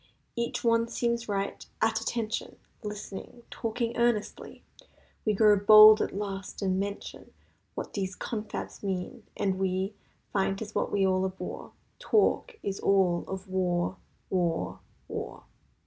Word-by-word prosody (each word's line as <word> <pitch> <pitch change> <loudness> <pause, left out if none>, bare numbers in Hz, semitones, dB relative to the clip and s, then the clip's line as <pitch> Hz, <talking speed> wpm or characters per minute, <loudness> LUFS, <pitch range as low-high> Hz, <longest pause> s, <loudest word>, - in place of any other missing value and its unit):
Each 235 +1 -2
one 230 0 +3
seems 235 -1 -1
right—"At 215 +2 -1
attention!" 225 -1 -3 0.3
Listening—talking 230 +2 -5
earnestly— 235 -3 -1 0.6
We 215 - +3
grow 210 0 +6
bold 215 +1 +9
at - - -2
last 195 0 -5
and 190 -1 +1
mention 200 +1 -5 0.4
What - - -5
these 190 -2 -2
confabs 215 -2 -5
mean, 190 -3 -4
and 190 -2 0
we 190 +1 0 0.4
Find 195 -1 +1
'tis 215 +1 -7
what - - -1
we 200 -1 +2
all 185 0 +2
abhor— 190 0 -5 0.3
Talk 440 +2 +2
is 195 -1 -3
all 185 -3 +3
of 190 +1 -6
war—war—^war. 185 0 0
205 Hz, 115 wpm, -29 LUFS, 190-225 Hz, 0.6 s, bold